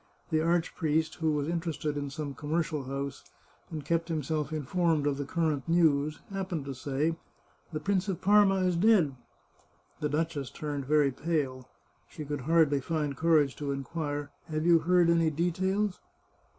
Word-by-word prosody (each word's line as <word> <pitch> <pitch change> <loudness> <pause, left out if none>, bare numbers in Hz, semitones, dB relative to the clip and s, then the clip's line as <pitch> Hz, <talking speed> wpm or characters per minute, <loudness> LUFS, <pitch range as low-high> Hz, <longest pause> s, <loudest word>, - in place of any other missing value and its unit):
The 155 0 +2
archpriest, 160 -2 +1
who 160 -2 +1
was 145 -1 -1
interested 165 -3 -2
in 145 -1 -3
some 140 0 -5
commercial 155 -1 -2
house, 140 +1 -4 0.5
and 155 -3 -6
kept 165 0 0
himself 155 -1 -2
informed 155 +1 0
of 145 -1 +1
the 140 - -3
current 155 -1 -1
news, 155 -3 +2
happened 190 -6 -3
to 135 - -4
say: 140 +5 -1 0.3
" - - -36
The 155 - -4
Prince 200 -1 0
of 190 -4 -2
Parma 200 -1 +4
is 180 -1 +2
dead." 180 -6 +4 0.9
The 150 - -1
duchess 150 -3 -1
turned 145 -2 -4
very 150 -2 +4
pale. 135 -4 -2 0.4
She 155 - -7
could 145 -1 -3
hardly 150 -1 +3
find 150 -1 -2
courage 155 -2 +3
to 145 -2 -3
inquire, 145 +1 -4
" - - -38
Have 155 0 -2
you 170 -1 +6
heard 175 +2 +3
any 165 -1 +4
details 185 +5 0
155 Hz, 165 wpm, -29 LUFS, 145-170 Hz, 0.9 s, you